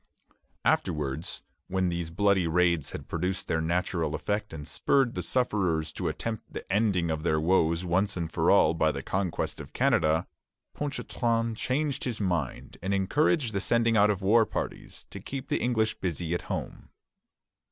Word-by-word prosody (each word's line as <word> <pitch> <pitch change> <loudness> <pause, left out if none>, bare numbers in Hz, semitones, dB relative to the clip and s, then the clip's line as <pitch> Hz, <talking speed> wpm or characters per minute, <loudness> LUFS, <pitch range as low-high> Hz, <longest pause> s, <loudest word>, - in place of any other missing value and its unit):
" - - -43
Afterwards, 75 0 -4 0.2
when 95 -1 0
these 85 -1 -3
bloody 95 0 +2
raids 85 -3 +2
had - - -7
produced 90 +3 -2
their 80 - 0
natural 85 -1 0
effect 105 +4 -2
and 75 -2 -7
spurred 135 +4 +2
the - - -3
sufferers 90 - 0
to 90 - -3
attempt 90 +8 -4
the - - -6
ending 95 -6 +2
of 80 -1 -2
their 80 -1 +1
woes 85 0 +2
once 95 +3 +1
for - - +1
all - - +5
by 80 -1 +2
the 70 -2 -5
conquest 95 +1 -2
of - - -12
Canada, 80 +3 +2 0.5
Ponchartrain 115 -5 -1
changed 140 +4 -1
his 120 -4 -2
mind 90 - -2
and 95 +2 0
encouraged 130 - +2
the 100 - 0
sending 115 +1 +2
out 105 0 +5
of 100 -2 -1
war 110 +4 +5
parties, - - -5
to - - -7
keep 135 0 -6
the - - 0
English 110 -3 +1
busy 85 -2 -2
at 85 - -1
home. - - -5
95 Hz, 165 wpm, -28 LUFS, 80-110 Hz, 0.5 s, all